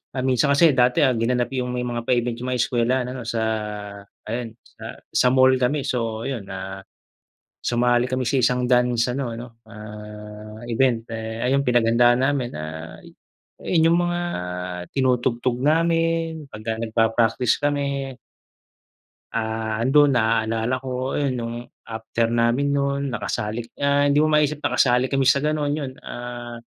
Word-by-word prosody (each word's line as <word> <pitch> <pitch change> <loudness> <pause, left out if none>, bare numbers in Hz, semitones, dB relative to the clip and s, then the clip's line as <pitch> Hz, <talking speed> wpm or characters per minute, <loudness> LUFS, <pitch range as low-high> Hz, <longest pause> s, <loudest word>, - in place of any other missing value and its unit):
Ah, 130 0 -3
minsan 130 +2 +2
kasi 145 +1 +5
dati, 125 +2 +4
ah, 130 - +2
ginanap 120 +2 +1
'yung 125 -1 -1
may 125 0 -2
mga 120 -1 -3
pa-event 120 -1 0
'yung 125 +2 -5
mga 125 - -1
eskwelahan 125 +1 +1
ano, 125 - -6
sa 115 0 -2 0.8
ayan 115 +1 -5
sa - - -10
sa - - +1
mall 130 0 +5
kami. 130 +2 0
So 115 -1 -2
ayun, 115 -8 -5
ah, 95 0 -6 0.8
sumali 120 +1 +2
kami 130 -1 -1
sa 140 - 0
isang 125 +1 +2
dance 125 -1 +3
ano 135 -3 -2
ano, 120 +2 -7 0.2
ah, 105 0 -10
event 120 -1 +1
eh, 110 0 -5
ay 130 - +2
'yung 140 - +3
pinaghandaaan 120 0 +4
namin, 135 -4 0
ah, 80 +1 -7 0.6
'yun 165 -2 +3
'yung - - +3
mga 175 0 0 0.7
tinutugtog 125 -1 0
namin 165 0 +1
pagka 110 +1 -4
nagpa-practice 115 +1 +2
kami. 140 -2 -1 1.2
Ah, 110 -1 -2
ando'n 140 +4 +4
naalala 115 +1 +1
ko 130 0 -3
'yun, 135 -4 0
no'ng 115 0 -4 0.3
after 115 +1 -2
namin 120 +5 +1
no'n 140 -2 -1
nakasalik 115 +1 -3
ah, 140 0 +2
hindi 140 - +3
mo 155 - +4
maisip 150 -1 +2
nakasali 125 -3 +2
kami 135 0 0
sa 135 +1 +4
gano'n 150 0 0
'yun. 145 -3 -3
Ah, 120 -1 -7
125 Hz, 150 wpm, -23 LUFS, 115-135 Hz, 1.2 s, kasi